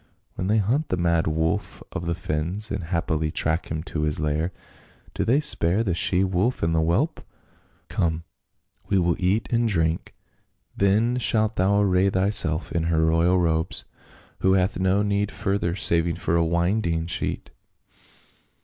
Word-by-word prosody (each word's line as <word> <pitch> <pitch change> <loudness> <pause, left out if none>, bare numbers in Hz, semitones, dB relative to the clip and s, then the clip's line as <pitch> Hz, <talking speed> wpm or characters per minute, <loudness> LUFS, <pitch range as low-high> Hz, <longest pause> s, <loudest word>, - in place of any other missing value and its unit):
When 90 - -4
they 105 +2 +2
hunt 120 +10 0
the 90 - 0
mad 85 -1 +1
wolf 80 +5 -1
of 85 - -5
the 85 - 0
fens 85 +6 -3
and 95 -3 -3
haply 80 -2 -1
track 80 +2 -1
him 80 0 -3
to 80 - -4
his 75 -1 -1
lair, 75 +2 0 0.6
do - - -1
they 130 +6 +3
spare 110 - +2
the 95 -5 0
she 90 +2 +2
wolf 95 +5 0
and 80 0 +1
the 80 - +2
whelp? 105 - 0 0.7
Come, 80 -1 -1 0.7
we 100 - +3
will 85 -2 +2
eat 95 +5 +1
and 120 0 +2
drink, 80 -4 -1 0.6
then 110 +5 +2
shalt 110 -2 0
thou 100 +2 +2
array 95 -1 +3
thyself 95 -4 +1
in 85 -1 -1
her 80 -1 +2
royal 85 +3 +3
robes 80 0 +1 0.3
— - - -27
who 95 - +3
hath 95 0 +1
no 95 +2 +2
need 100 0 0
further 100 -3 -1
save 85 -2 +1
for 85 - -1
a 85 - +3
winding 85 0 0
sheet." 85 - -4
90 Hz, 165 wpm, -24 LUFS, 80-100 Hz, 0.7 s, they